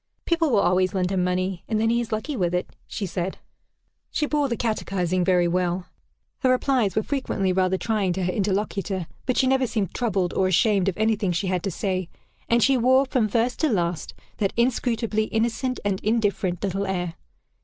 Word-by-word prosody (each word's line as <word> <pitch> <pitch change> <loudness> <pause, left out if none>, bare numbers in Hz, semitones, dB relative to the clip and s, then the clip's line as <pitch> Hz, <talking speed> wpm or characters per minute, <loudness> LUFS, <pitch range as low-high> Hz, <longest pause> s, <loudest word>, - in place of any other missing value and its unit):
"People 335 -2 +2
will 215 -6 +3
always 185 +2 +2
lend 185 0 0
him 185 -2 +1
money, 180 0 -1
and 220 -2 0
then 225 +1 +2
he 235 +1 +2
is 235 - -6
lucky 220 +7 -2
with 180 -5 0
it," 180 - -1 0.2
she 205 - -4
said. 180 +1 -3 0.7
She 300 - 0
bore 295 -2 0
the 235 - -1
catechising 185 -5 -1
very 180 -1 +3
well. 180 +1 0 0.5
Her 260 - +2
replies 255 -6 +2
were 215 - +2
frequently 200 -9 -1
rather 185 0 +2
trying 210 -3 0
to 185 +1 -2
her 180 - 0
interlocutor, 195 -2 -1 0.2
but 255 - +1
she - - +4
never 265 0 +2
seemed 205 -6 -2
troubled, 195 -7 0
or 190 - +2
ashamed 195 +1 +3
of 180 - -5
any 220 +1 +2
thing 200 -3 -1
she 175 +4 -1
had 185 -1 0
to 195 - -2
say; 185 -1 -2 0.4
and 235 -1 +4
she 270 -1 +4
wore, 260 +3 +4
from 255 -4 +1
first 235 +4 0
to 315 - +2
last, 175 - -1 0.2
that 200 -3 0
inscrutably 235 -3 +1
innocent 235 +4 -1
and 195 -2 0
indifferent 205 -5 0
little 195 0 -1
air. 180 -3 -2
200 Hz, 195 wpm, -24 LUFS, 185-235 Hz, 0.7 s, she